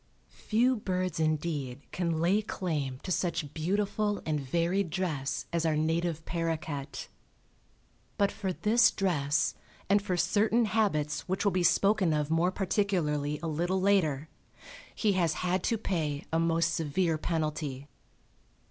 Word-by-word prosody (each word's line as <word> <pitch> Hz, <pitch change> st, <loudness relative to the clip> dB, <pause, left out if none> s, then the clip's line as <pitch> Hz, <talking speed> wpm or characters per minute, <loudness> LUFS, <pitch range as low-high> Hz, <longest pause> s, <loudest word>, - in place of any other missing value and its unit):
Few 245 Hz, +4 st, +3 dB
birds 185 Hz, -4 st, -2 dB
indeed 150 Hz, -4 st, -1 dB
can 170 Hz, -3 st, -1 dB
lay 185 Hz, +6 st, +3 dB
claim 155 Hz, -11 st, -3 dB
to 185 Hz, -, -4 dB
such 170 Hz, -5 st, -1 dB
beautiful 205 Hz, +5 st, 0 dB
and 155 Hz, -2 st, 0 dB
varied 170 Hz, +7 st, 0 dB
dress 155 Hz, -6 st, -2 dB
as 170 Hz, -1 st, +1 dB
our 160 Hz, -2 st, +2 dB
native 160 Hz, +1 st, 0 dB
paroquet. 160 Hz, -4 st, -3 dB, 1.1 s
But 200 Hz, -1 st, +2 dB
for 190 Hz, -2 st, -3 dB
this 230 Hz, +6 st, +4 dB
dress 150 Hz, -7 st, +1 dB, 0.3 s
and 200 Hz, +1 st, +4 dB
for 185 Hz, -3 st, -2 dB
certain 210 Hz, +7 st, +2 dB
habits 195 Hz, -9 st, 0 dB
which 190 Hz, +3 st, -1 dB
will 200 Hz, -, +4 dB
be 185 Hz, -, +1 dB
spoken 190 Hz, +1 st, +3 dB
of 150 Hz, 0 st, -1 dB
more 170 Hz, +3 st, +2 dB
particularly 170 Hz, -7 st, 0 dB
a -, -, -1 dB
little 175 Hz, +4 st, 0 dB
later, 165 Hz, -7 st, +2 dB, 0.7 s
he 210 Hz, -3 st, +2 dB
has 170 Hz, -4 st, +2 dB
had 180 Hz, +1 st, +1 dB
to 230 Hz, -, +1 dB
pay 155 Hz, -8 st, -2 dB
a 165 Hz, -, +3 dB
most 165 Hz, 0 st, +2 dB
severe 160 Hz, +1 st, 0 dB
penalty. 150 Hz, -4 st, -2 dB
170 Hz, 140 wpm, -30 LUFS, 155-195 Hz, 1.1 s, this